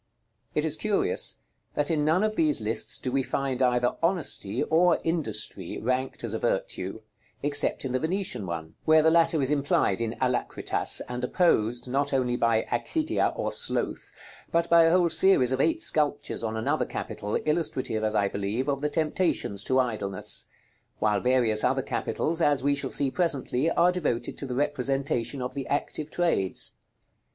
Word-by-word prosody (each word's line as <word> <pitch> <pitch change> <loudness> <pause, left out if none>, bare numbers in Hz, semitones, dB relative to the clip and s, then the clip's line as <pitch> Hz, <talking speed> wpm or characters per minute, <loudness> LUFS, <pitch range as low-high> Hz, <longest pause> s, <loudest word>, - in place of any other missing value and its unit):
It 150 - +1
is 155 -1 0
curious, 205 - 0 0.4
that 150 +2 0
in 150 -2 +1
none 160 +6 +2
of 215 0 0
these 155 -5 +2
lists 110 +1 0
do 130 - -4
we 135 +1 +1
find 135 0 -2
either 125 -1 +2
Honesty 165 - 0
or 170 +2 +3
Industry 110 - -2
ranked 130 +3 -2
as - - -3
a - - -2
virtue, - - -2 0.4
except 145 -1 +2
in 130 - -3
the 130 - 0
Venetian 160 - -2
one, 80 -2 -5
where 155 0 +5
the 160 - +4
latter 165 -2 +3
is 135 - -1
implied 140 -8 +1
in 115 0 -2
Alacritas, 125 -1 +1
and 125 0 -5
opposed 120 -6 +1
not 140 +3 0
only 125 -2 +1
by 115 -2 +2
"Accidia" 310 - 0
or - - -2
sloth, 485 - -1 0.4
but 170 0 +1
by 170 -1 +7
a - - +5
whole 175 -2 +3
series 145 -10 +4
of 130 - +1
eight 330 +1 +1
sculptures 145 - +1
on 110 0 -2
another 110 - 0
capital, 105 +1 -4
illustrative, 150 -8 -1
as 110 0 0
I 100 - +2
believe, 100 +6 -3
of 140 -1 -1
the 150 - 0
temptations 155 - -1
to 130 - +1
idleness; 110 -6 -1 0.5
while 105 -1 +1
various 120 -3 +2
other 130 +1 +1
capitals, 165 +4 -2
as 145 -4 +2
we 145 0 +2
shall 140 - -2
see 140 -2 0
presently, 150 -4 +1
are 170 +1 +3
devoted 155 -10 -2
to 140 - -5
the 125 - -4
representation 135 -2 -1
of 125 - -4
the 140 -2 -5
active 150 +1 -3
trades. 165 - 0
135 Hz, 170 wpm, -27 LUFS, 120-160 Hz, 0.5 s, by